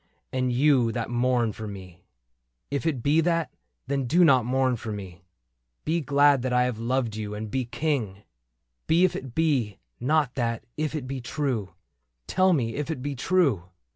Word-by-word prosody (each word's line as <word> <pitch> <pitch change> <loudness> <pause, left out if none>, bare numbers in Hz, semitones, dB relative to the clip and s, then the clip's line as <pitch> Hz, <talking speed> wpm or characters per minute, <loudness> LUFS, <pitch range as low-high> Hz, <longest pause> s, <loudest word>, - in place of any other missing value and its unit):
And 130 -1 0
you 130 -2 +3
that 120 -1 -3
mourn 120 -1 +1
for 110 +1 -7
me? 95 -4 -9
^^ - - -38 0.7
If 140 +3 -1
it 135 -7 -1
be 150 +3 +4
that, 165 -5 0 0.3
then 135 0 -1
do 175 +7 +5
not 130 -7 +5
mourn 130 0 +2
for 110 -1 -6
me; 95 -4 -7 0.6
Be 165 +2 +1
glad 145 -1 +4
that 130 0 -2
I 125 0 +3
have 125 -3 -2
loved 120 -1 -1
you, 105 -1 -4
and 105 0 -6
be 130 -1 -1
King« 115 -8 -2 0.6
But 160 - +3
if 185 +1 +4
it 130 -3 -7
be 135 -11 +1 0.2
not 145 +1 +1
that 115 -3 -2
— - - -50
if 155 - -3
it 145 -5 -3
be 130 0 -5
true... 120 - -3 0.5
Tell 185 - +3
me 120 -9 +1
if 150 +1 -3
it 150 -6 -4
be 145 0 -3
true 135 - +1
130 Hz, 190 wpm, -26 LUFS, 115-145 Hz, 0.7 s, do